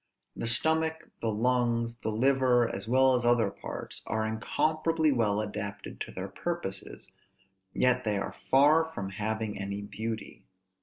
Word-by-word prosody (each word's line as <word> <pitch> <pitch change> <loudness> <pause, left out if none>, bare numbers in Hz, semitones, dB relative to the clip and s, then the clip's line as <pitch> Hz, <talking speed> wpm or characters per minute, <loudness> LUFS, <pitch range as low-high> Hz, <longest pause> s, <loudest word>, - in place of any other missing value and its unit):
The - - -3
stomach, 160 +6 +1
the 115 - 0
lungs, 115 +1 +1
the - - -2
liver, 125 +1 +3
as 100 0 -4
well 130 +2 +5
as 125 -1 +1
other 120 -4 +3
parts, - - -7
are 110 0 0
incomparably 155 +8 +1
well 110 -5 +1
adapted 105 -1 -6
to - - -4
their - - -5
purposes; - - -5 0.6
yet 125 0 +2
they 105 -2 0
are 100 - -4
far 150 +4 +6
from 95 -1 -3
having 110 0 -3
any 100 +1 -4
beauty. 110 +2 -6
115 Hz, 145 wpm, -29 LUFS, 105-130 Hz, 0.6 s, far